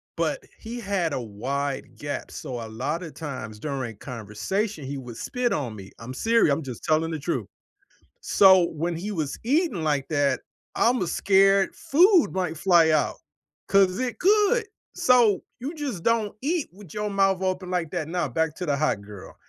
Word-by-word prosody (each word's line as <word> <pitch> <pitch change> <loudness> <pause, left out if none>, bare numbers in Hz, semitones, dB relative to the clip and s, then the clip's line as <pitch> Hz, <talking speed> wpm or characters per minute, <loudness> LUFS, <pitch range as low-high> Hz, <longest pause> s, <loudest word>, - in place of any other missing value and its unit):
But - - -1 0.2
he 235 +2 -6
had 195 -6 -1
a 135 - -1
wide 135 +6 -4
gap, 145 0 -5
so 120 -2 -6
a - - -9
lotta 150 +9 -3
times 130 -10 -7
during 130 -5 -4
conversation, 130 - -3
he 140 +1 -4
would 125 -3 -8
spit 250 -1 -1
on 125 -7 -2
me. 95 -2 -10
I'm 115 +2 -7
seriou 225 - +3
I'm 155 +3 -2
just 125 -4 -8
telling 160 +1 +2
the 160 - -3
truth. 170 +4 -2 0.7
So 190 -3 +6
when 165 +2 -2
he 190 +6 -4
was 155 -7 -3
eating 280 - +1
like 145 -3 0
that, 145 -4 +1 0.4
I’m 245 +2 +3
a - - -3
scared 195 0 +4
food 350 +3 +4
might 180 -4 -2
fly 170 -1 +5
out, 155 -2 +1 0.5
'cause 195 0 +3
it 255 -2 -2
could. 425 +4 +3 0.3
So, 250 - +4 0.2
you 270 +6 -4
just 270 - -4
don't 225 -3 +1
eat 310 +3 -1
with 190 -5 -13
your 210 0 -2
mouth 195 -1 +2
open 185 -1 -2
like 175 -4 -1
that. 170 -4 -3
Now, 175 +1 -1
back 160 -2 -1
to 180 - -3
the 145 -3 +1
hot 150 -8 0
girl, 100 -1 -11
170 Hz, 180 wpm, -25 LUFS, 140-210 Hz, 0.7 s, So